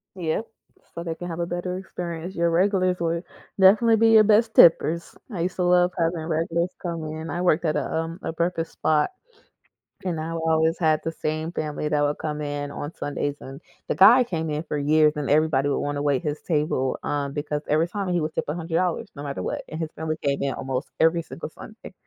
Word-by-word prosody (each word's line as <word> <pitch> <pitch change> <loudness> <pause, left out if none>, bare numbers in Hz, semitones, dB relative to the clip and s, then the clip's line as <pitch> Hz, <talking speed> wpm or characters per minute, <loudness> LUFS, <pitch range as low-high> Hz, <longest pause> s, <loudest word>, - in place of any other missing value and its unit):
Yes, 170 +2 -1 0.5
so 170 - -5
they 165 -1 -4
can 175 +1 -7
have 165 -1 -5
a 170 - 0
better 180 +1 -3
experience. 175 -1 -6
Your 170 0 +1
regulars 185 0 +2
would 170 0 -1 0.4
definitely 220 +4 +6
be 225 +1 +4
your 220 -1 +8
best 220 +2 +3
tippers. 170 0 +5 0.2
I 175 - -3
used 180 +1 -2
to 180 - -1
love 180 0 +4
having 165 -1 -1
regulars 165 +2 0
come 170 -3 -4
in. 155 +1 -6
I 175 - -2
worked 175 -1 +2
at 155 - +1
a, - - -2
um, 165 +1 -3
a - - -3
breakfast 170 0 -2
spot, 155 -1 +1 0.9
and 175 -4 -2
I 160 +1 -4
would 165 - -3
always 160 0 +2
have 155 -3 +3
the 165 - -3
same 155 +1 -3
family 150 -2 -3
that 150 -1 +1
would 145 0 0
come 150 -1 -4
in 145 -1 -4
on 145 +3 -6
Sundays, 145 0 -3
and, 135 +3 -9 0.3
the - - -1
guy 240 +7 +8
came 160 -7 -3
in 150 +2 -2
for 150 - -3
years, 150 +1 +4
and 150 -2 -3
everybody 145 -2 +3
would 140 - 0
wanna 145 0 -2
wait 145 -3 +1
his 150 0 -3
table, 150 -5 0
um, 140 -1 -2
because 150 0 -3
every 155 +3 +3
time 195 +1 -3
he 175 -1 +1
would 155 +1 -3
tip - - -2
$100 165 +2 -1
no 145 - -7
matter 140 -1 -4
what, - - -3
and 155 - -6
his 160 -2 -3
family 155 0 -3
came 140 -1 0
in 140 - 0
almost 130 0 -4
every 165 +1 +4
single 160 0 -8
Sunday 220 +6 -12
160 Hz, 220 wpm, -24 LUFS, 150-175 Hz, 0.9 s, your